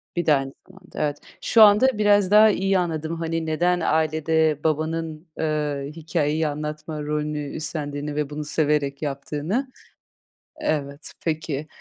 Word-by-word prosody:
bir 175 - -1
de 155 - +5
aynı 135 0 -3
zamanda. 185 -1 -12
Evet. 145 -1 0 0.2
Şu 225 - +4
anda 210 +5 +7
biraz 205 -2 +3
daha 215 +1 +8
iyi 195 -1 +1
anladım 160 -1 -2
hani 165 0 -2
neden 175 +3 +1
ailede 160 -1 +1
babanın, 160 +1 -2
eee, 150 -2 -1
hikâyeyi 160 -1 0
anlatma 150 +1 -5
rolünü 150 -1 -3
üstlendiğini 150 -2 -4
ve 150 -1 -1
bunu 150 0 -5
severek 150 -2 0
yaptığını. 150 - -3 0.9
Evet, 140 -1 -2
peki. 155 -2 -2
155 Hz, 130 wpm, -23 LUFS, 150-165 Hz, 0.9 s, daha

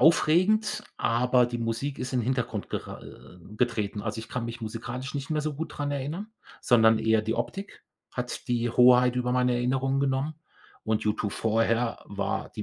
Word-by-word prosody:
aufregend, 180 +7 +4
aber 125 +1 +3
die 120 0 -4
Musik 115 +5 -2
ist 125 0 -4
in 125 - +2
Hintergrund 120 -3 -2
gera - - -5
äh, 65 +9 -13 0.2
getreten. 105 -4 -1
Also 105 0 -3
ich 110 - -7
kann 125 -2 -3
mich 115 +1 -6
musikalisch 120 +5 -5
nicht 140 +1 -4
mehr 155 -1 +1
so 155 -1 -2
gut 160 +3 -5
daran 145 -1 -3
erinnern, 160 +11 -4 0.3
sondern 110 -2 +5
eher 110 0 +2
die 110 +1 -1
Optik 195 +9 -5 0.3
hat 125 -1 -5
die 120 -1 +1
Hoheit 125 +1 +6
über 125 0 0
meine 125 0 +2
Erinnerungen 135 +2 +1
genommen 140 +2 0 0.5
und 110 -1 0
U2 105 -1 -1
vorher 115 +2 0
war 100 -1 -3
die - - -6
125 Hz, 175 wpm, -27 LUFS, 115-135 Hz, 0.5 s, Hoheit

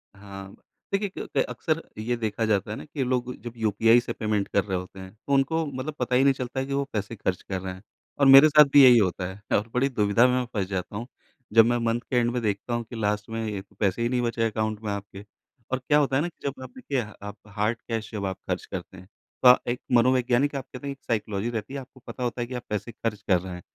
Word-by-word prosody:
हाँ, 100 -1 -10 0.4
देखिए 200 0 +1
क - - -5
क - - +5
अक्सर 160 0 -1 0.2
ये 120 +3 -1
देखा 110 0 -1
जाता 105 -1 +1
है - - -3
ना - - -8
कि 145 -2 -3
लोग 125 0 -1
जब 120 -1 -7
यूपीआई 115 +2 +4
से - - -4
पेमेंट 105 -2 -1
कर 100 - +1
रहे 95 -3 -2
होते 90 +1 -8
हैं 95 0 -9
तो 140 +6 -5
उनको 160 +4 +2
मतलब 140 +2 -5
पता 125 0 0
ही 130 - +5
नहीं 140 -1 +5
चलता 130 0 -4
है 135 - -1
कि 140 - -4
वो 140 0 +1
पैसे 105 +2 -3
खर्च 95 -2 -2
कर 95 -1 -4
रहे 95 -1 -5
हैं। 95 - -12 0.4
और 140 - +5
मेरे 135 +3 +10
साथ 150 0 +8
भी 140 -1 +9
यही 125 -2 +9
होता 95 -3 +1
है 105 +1 -1
और 110 +3 -3
बड़ी 135 +3 +2
दुविधा 105 +1 +3
में 125 0 +1
फँस 100 -3 0
जाता 95 0 -4
हूँ। 120 +3 -6 0.5
जब 115 -1 +8
मैं 120 0 +2
मन्थ 115 +1 0
के 125 - -1
एंड 120 0 +2
में 125 -1 -2
देखता 105 +2 -2
हूँ 120 0 -1
कि 120 - -8
लास्ट 105 0 -1
में 115 0 -3
ये 105 -2 -3 0.2
पैसे 100 +3 +1
ही 120 - +1
नहीं 125 -1 0
बचे 115 -1 -1
अकाउंट 110 0 -2
में 105 - -2
आपके 100 0 -7 0.5
और 130 - +1
क्या 150 - +5
होता 135 -2 +1
है 145 - +3
ना 175 - -1
कि 160 -4 -7
जब 135 -1 -5
आप - - -8
देखिए 145 - -2 0.3
आप 105 - -8 0.2
हार्ड 110 +3 +1
कैश 110 -2 -3
जब 100 -2 -3
आप 95 0 -3
ख़र्च - - -2
करते 95 - -7
हैं, 95 +1 -13 0.4
तो 125 0 +9
एक 125 - -3
मनोवैज्ञानिक 125 +3 +3
आप 135 -1 -4
कहते 135 +2 -7
हैं - - -2
एक 135 - -9
साइकोलॉजी 110 -1 -1
रहती 115 +2 -5
है, 140 - -3
आपको 130 0 -13
पता 125 - -6
होता 120 0 -2
है 120 - -2
कि 130 - -8
आप 120 - -5
पैसे 105 +2 -3
ख़र्च 105 -2 -4
कर 90 -2 +5
रहे 90 -1 -7
हैं, 90 - -8
115 Hz, 270 wpm, -26 LUFS, 105-130 Hz, 0.5 s, मेरे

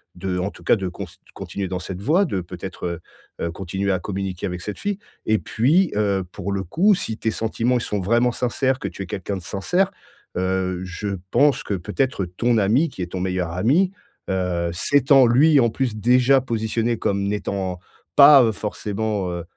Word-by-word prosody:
de, 90 0 -3
en 90 +2 -1
tout - - -15
cas, - - +4
de 95 -4 -3
const 90 -1 -8 0.2
continuer 100 -1 -5
dans 90 0 -3
cette 90 +1 -7
voie, 165 - +3
de 95 - -2
peut-être, 90 -1 -6 0.4
heu, 85 - -2
continuer 95 +2 -3
à 95 - 0
communiquer 95 0 -4
avec 90 -1 -5
cette 105 - -6
fille 205 -1 -2 0.3
et 110 - +4
puis, 155 - +2
heu, 100 -2 +1
pour 100 0 -5
le 100 -1 -1
coup, 195 - +3
si 115 - -5
tes 110 - 0
sentiments 115 +3 -1
ils - - -2
sont 105 -2 -2
vraiment 120 +6 +2
sincères, 130 +2 0
que - - -3
tu 100 - -6
es - - -7
quelqu'un 95 +2 -4
de 90 - -9
sincère, 180 - 0 0.5
heu, 95 0 -1
je 90 +3 -5 0.2
pense 145 +2 +3
que 100 - -3
peut-être 100 +3 -1
ton 115 +7 0
ami, 115 +11 +3
qui 95 - -6
est 85 - -7
ton 95 - -3
meilleur 90 -2 -2
ami, 135 - +2 0.4
heu, 90 -2 -1
s'étant 135 - +4
lui, 145 +5 +5
en 120 -2 +4
plus, 120 -1 -2
déjà 125 +4 +4
positionné 115 -1 -1
comme 100 -1 -1
n'étant 100 -3 -2 0.4
pas, 140 -1 +9
heu, 115 - +2
forcément, 105 -2 -3
heu 85 -1 -4
100 Hz, 195 wpm, -22 LUFS, 95-125 Hz, 0.5 s, pas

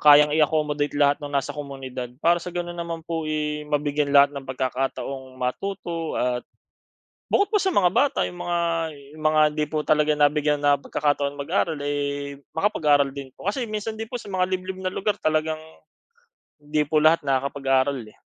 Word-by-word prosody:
kayang 150 0 +7
i-accommodate 150 -1 +1
lahat 145 0 +3
ng 145 - -5
nasa 140 -2 -1
komunidad. 135 -4 -6 0.2
Para 170 +1 +4
sa 180 - -6
gano'n 175 0 -4
naman 170 -1 -5
po, 165 -2 -3
eh, 150 -1 -2
mabigyan 145 -1 0
lahat 140 0 +7
ng 140 -2 -8
pagkakataong 130 0 -3
matuto 165 +5 -3
at 125 0 0 0.9
bukod 405 +1 +2
po 420 - +3
sa 385 - 0
mga 180 -3 +4
bata, 280 +9 +2
'yong 175 - -5
mga, 175 0 -1 0.5
'yong 155 0 -12
mga 155 0 +4
hindi 150 0 0
po 150 0 -2
talaga 150 0 +3
nabigyan 150 0 +2
na 145 0 +4
pagkakataon 145 0 -1
mag-aral, 160 +2 -1
eh, 140 -1 -3 0.2
makapag-aaral 150 -7 +3
din 140 -1 -7
po. - - -13
Kasi 240 +2 -3
minsan 215 +1 -4
'din 225 - -4
po, 245 - -7
sa 220 -4 -6
mga 185 -1 +1
liblib 185 0 -3
na 185 0 -1
lugar 205 0 -1
talagang 155 0 0 1.0
'di 150 0 0
po 155 - +2
lahat 160 +2 +5
nakakapag-aaral, 135 -1 +1
eh. - - -22
150 Hz, 175 wpm, -24 LUFS, 140-170 Hz, 1.0 s, kayang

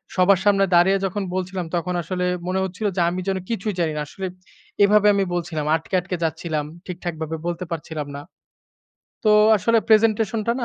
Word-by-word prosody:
সবার 185 0 +4
সামনে 195 -1 +4
দাঁড়িয়ে 185 +3 +5
যখন 195 +2 -2
বলছিলাম 185 -1 -3
তখন 175 +1 -1
আসলে 180 +2 -3 0.2
মনে 185 +1 0
হচ্ছিল 190 +3 -3
যে, 180 - +1
আমি 180 +1 -3
যেন 190 -1 0
কিছুই 215 -2 -2
জানি 165 -2 +1
না। 150 - -1
আসলে 190 +4 -6 0.6
এভাবে 210 +1 +5
আমি 200 - +2
বলছিলাম, 170 -3 -3
আটকে, 160 +4 -7
আটকে 180 +1 -4
যাচ্ছিলাম। 160 -1 -2 0.2
ঠিকঠাকভাবে 165 -3 -5
বলতে 175 +1 -3
পারছিলাম 155 -2 -5
না। 145 - -6 1.0
তো 215 - +4 0.3
আসলে 230 +3 +2
প্রেজেন্টেশনটা 220 0 +3
না? 240 - -1
185 Hz, 170 wpm, -22 LUFS, 170-200 Hz, 1.0 s, দাঁড়িয়ে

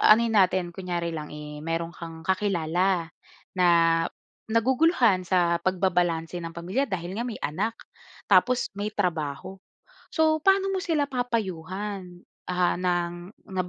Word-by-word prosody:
anohin 225 0 +5
natin, 185 -2 +3
kunyari 175 -2 -3
lang, 155 -2 -5
eh, 150 0 -8
meron 165 +1 -2
kang 165 -1 -9
kakilala 180 -1 0 0.5
na 180 -1 +5 0.8
naguguluhan 230 - +3
sa 175 -2 +2
pagbabalanse 175 -2 0
ng 165 -1 -7
pamilya 185 +12 -1
dahil 185 -1 -4
nga 235 - -1
may 235 - -6
anak, 205 +10 -1 0.6
tapos 250 0 +4
may 205 - -1
trabaho. 175 -1 -2 0.6
So, 315 -1 +3
paano 390 +2 +3
mo 380 - 0
sila 310 -5 +1
papayuhan, 195 - -4 0.3
ah, 180 -1 +2
ng 175 -1 0 0.4
nga 185 - +1
185 Hz, 125 wpm, -26 LUFS, 170-220 Hz, 0.8 s, anohin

